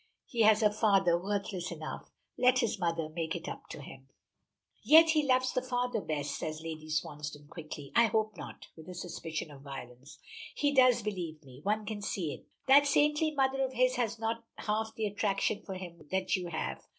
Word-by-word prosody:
He 235 - -2
has 215 0 +6
a 210 - +5
father 195 -5 +4
worthless 190 -1 -2
enough. 155 -2 -7 0.3
Let 250 0 +4
his 235 -3 0
mother 165 -2 0
make 160 +1 -3
it 170 +1 -6
up - - -7
to 145 - -8
him." 135 0 -12 0.7
"Yet 320 +1 +8
he 310 -1 +3
loves 255 -2 +2
the 255 - +1
father 245 -3 -1
best," 145 -3 -3
says 155 -2 -4
Lady 155 -1 -6
Swansdown 150 -1 -4
quickly. 155 -4 -8
"I 235 - +7
hope 215 -1 0
not," - - -9
with 160 +2 -12
a 180 - -7
suspicion 165 -3 -5
of 140 -2 -12
violence. 135 -1 -10 0.4
"He 290 -1 +1
does, 255 -4 +5
believe 175 -7 -4
me. 130 -2 -13
One 210 +4 0
can 210 -1 -4
see 180 -6 -2
it. - - -12 0.2
That 285 +2 +7
saintly 300 +2 +3
mother 270 -2 +1
of 260 0 -2
his 255 0 +2
has 235 -3 0
not 225 +1 -2
half 220 +1 -1
the 220 - -1
attraction 205 0 0
for 190 - -7
him 175 -4 -9
that 190 0 +1
you 180 -2 -3
have. 160 -2 -3
200 Hz, 195 wpm, -31 LUFS, 160-245 Hz, 0.7 s, Yet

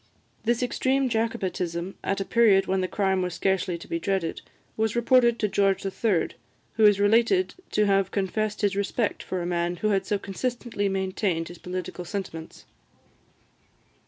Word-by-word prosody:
This 235 +2 +1
extreme 260 +1 +1
Jacobitism 190 -6 -2
at 195 - -1
a 195 - -2
period 205 -4 +4
when 190 0 0
the 185 - 0
crime 190 0 0
was 180 -1 -2
scarcely 190 -2 0
to 170 - -12
be 170 - -2
dreaded, 190 -2 -1 0.3
was 220 0 0
reported 240 0 +4
to 215 - +1
George 195 -1 +1
III., 195 -2 0 0.4
who 220 - +4
is 205 -1 +6
related 230 - +3 0.2
to 210 - +3
have 195 -2 +2
confessed 210 +2 -2
his 200 -2 +1
respect 200 +2 -1
for 185 -2 -3
a - - -3
man 175 0 -1
who 215 +5 -1
had 195 -2 +1
so 205 - +1
consistently 225 +1 -3
maintained 190 -3 -1
his 175 - -11
political 180 0 -5
sentiments. 175 -4 -6
195 Hz, 160 wpm, -26 LUFS, 185-220 Hz, 0.4 s, is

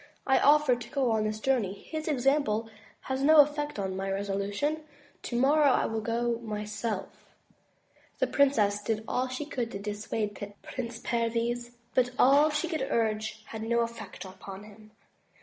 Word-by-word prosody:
I 265 -1 +4
offered 290 -4 +4
to 235 - -8
go 265 -4 +1
on 220 -1 +1
this 215 0 -2
journey. 230 -6 +1
His 310 +9 -6
example 270 -6 +1 0.3
has 265 0 -3
no 310 +3 +6
effect 295 -1 -1
on 190 -2 -2
my 195 +1 -3
resolu 200 0 -2
tion. 295 +9 -1 0.4
Tomorrow 280 +4 +3
I - - +3
will 225 0 -2
go 235 +1 -1
myself." 210 -1 -5 0.9
The - - +2
Princess 215 -8 +2
did 220 +1 -2
all 255 +1 0
she 255 +3 -4
could 245 -6 -3
to - - -3
dissuade 205 0 -4
Prince 240 -2 -5
Perviz, 235 +1 -1 0.2
but 250 -1 +3
all 285 +4 +6
she 300 +3 -1
could 315 -5 -2
urge 220 -1 -1
had 220 0 -7
no 235 +1 +1
effect 230 -3 -5
upon 190 +1 -9
him. 215 0 -15
230 Hz, 160 wpm, -29 LUFS, 210-270 Hz, 0.9 s, no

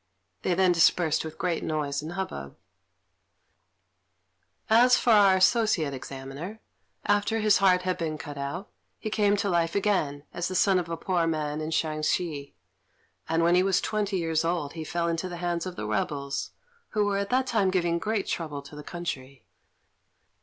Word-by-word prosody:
They 180 - +1
then 185 0 +4
dispersed 165 -2 +3
with 160 -1 -8
great 170 -2 -1
noise 145 -2 -2
and 160 +3 -6
hubbub. 70 - -5 2.1
As 245 +3 +6
for 240 - +2
our 200 -3 +6
Associate 185 - +3
Examiner, 135 +10 -7 0.5
after 205 +2 +2
his 215 -2 +4
heart 185 -2 +4
had 185 0 -1
been 155 -2 -2
cut 145 0 -8
out, 140 +7 -5 0.3
he 215 - -5
came 205 -1 +2
to 200 - -1
life 170 -3 +1
again 180 -9 0
as 175 0 -2
the 185 - -4
son 190 0 +4
of 170 -2 -5
a 165 - -3
poor 175 -1 0
man 155 -1 -2
in 155 - -3
Shensi; 155 -1 -1 0.7
and 165 +1 +2
when 170 +1 +4
he 180 - +5
was 190 -1 +2
twenty 205 -2 -1
years 165 -2 0
old 165 -4 -1
he 160 -1 -5
fell 170 +2 -2
into 170 +2 -2
the 175 - -6
hands 175 0 -2
of 180 - -6
the 105 - -5
rebels, 140 +6 -2 0.5
who 210 - +4
were 200 -1 0
at 200 0 -2
that 255 +2 +2
time 220 -6 +2
giving 175 -2 +1
great 215 +1 -1
trouble 150 -4 -4
to 145 +1 -12
the 150 - -8
country. 140 -7 -6
170 Hz, 175 wpm, -27 LUFS, 155-195 Hz, 2.1 s, As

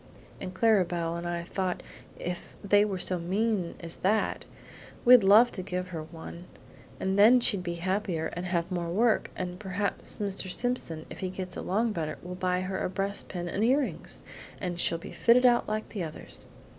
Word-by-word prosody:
And 185 - -5
Clara 220 -1 +4
Belle 170 -1 -2
and 170 0 -4
I 170 0 -2
thought 185 0 -3 0.3
if 180 0 -6
they 205 +1 +5
were 200 -3 -1
so 180 0 -1
mean 190 +1 -1
as 170 -1 -5
that, 210 +3 0 0.6
we'd 245 -2 +9
love 215 +5 +7
to 185 - -4
give 180 0 -4
her 165 -3 -5
one, 165 +2 -9 0.5
and 190 +1 0
then 235 +5 +8
she'd 210 -5 +3
be 175 -1 -3
happier 180 -2 -1
and 175 +1 -4
have 175 0 -1
more 175 -2 -2
work; 220 +6 +2
and 180 -1 -4
perhaps 200 0 -1
Mr. 195 -2 -1
Simpson 180 -8 -2
if - - -8
he 185 - -2
gets 185 -1 -5
along 220 +5 0
better 155 -5 -3
will 180 +1 -6
buy 180 0 0
her 190 0 -3
a - - -1
breast 195 +2 -3
pin 175 -2 -5
and 195 +5 -1
earrings, 265 +4 0 0.4
and 175 -2 -3
she'll 170 - +3
be 165 - -9
fitted 245 +2 +4
out 240 -1 +4
like 215 0 -3
the 200 -5 -4
others. 155 -2 -2
185 Hz, 190 wpm, -29 LUFS, 175-210 Hz, 0.6 s, we'd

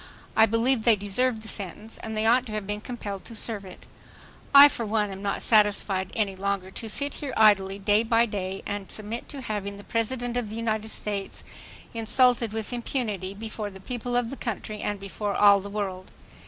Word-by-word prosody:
I 220 - +6
believe 230 +3 +2
they 225 0 +5
deserved 220 +3 0
the - - -8
sentence, 210 +2 -6
and 220 -1 -5
they 215 - +1
ought 245 +3 +4
to 215 - -7
have 210 -2 -3
been 210 +1 -3
compelled 210 -5 -6
to 230 - -6
serve 215 -2 +1
it.... 185 - -12 0.7
"I 280 +1 +11
for 245 -4 -4
one 210 -1 0
am 195 0 -7
not 200 0 -2
satisfied 205 -3 +2 0.2
longer 195 -1 -2
to 225 +3 -6
sit 285 +6 +1
here 285 -3 -5
idly 195 -3 +4
day 205 +2 +3
by 230 0 +3
day 195 -3 -4
and 205 -1 -4
submit 215 +2 -5
to 280 -3 -5
having 205 -4 -4
the 200 - -11
President 240 +2 -2
of 235 -4 -2
the 215 - -6
United 220 -1 -2
States 205 -2 -4 0.5
insulted 235 0 +2
with 220 +2 -4
impunity 215 -6 -3
before 215 0 -5
the 190 -1 -12
people 245 +3 -4
of 245 -1 0
the 275 - -6
country 215 -2 -5
and 205 -1 -2
before 200 +1 -4
all 200 -1 +6
the 200 - -7
world. 195 -3 -4
215 Hz, 195 wpm, -26 LUFS, 200-230 Hz, 0.7 s, I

